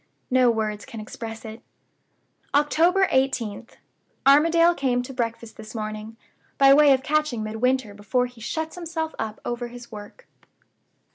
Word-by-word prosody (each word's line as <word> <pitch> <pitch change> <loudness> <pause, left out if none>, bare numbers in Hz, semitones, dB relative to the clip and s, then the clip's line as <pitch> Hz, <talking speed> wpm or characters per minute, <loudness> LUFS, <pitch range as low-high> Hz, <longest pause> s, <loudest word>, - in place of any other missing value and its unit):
No 255 -1 +5
words 215 -2 -1
can 230 -4 -9
express 225 +1 -8
it." 220 +1 -9 0.9
"October 335 +6 +3
18th. 255 -5 -1 0.5
Armadale 330 +5 +5
came 250 -5 0
to 270 - -8
breakfast 230 -2 -4
this 220 +1 -10
morning, 215 0 -6 0.4
by 275 0 +7
way 290 0 +6
of 265 -1 +3
catching 300 -7 0
Midwinter 220 +1 -1
before 205 +5 0
he 245 -2 -12
shuts 320 +7 -3
himself 330 -2 -4
up 215 -1 -4
over 240 0 -3
his 240 0 -12
work. 205 -1 -11
245 Hz, 140 wpm, -24 LUFS, 220-285 Hz, 0.9 s, by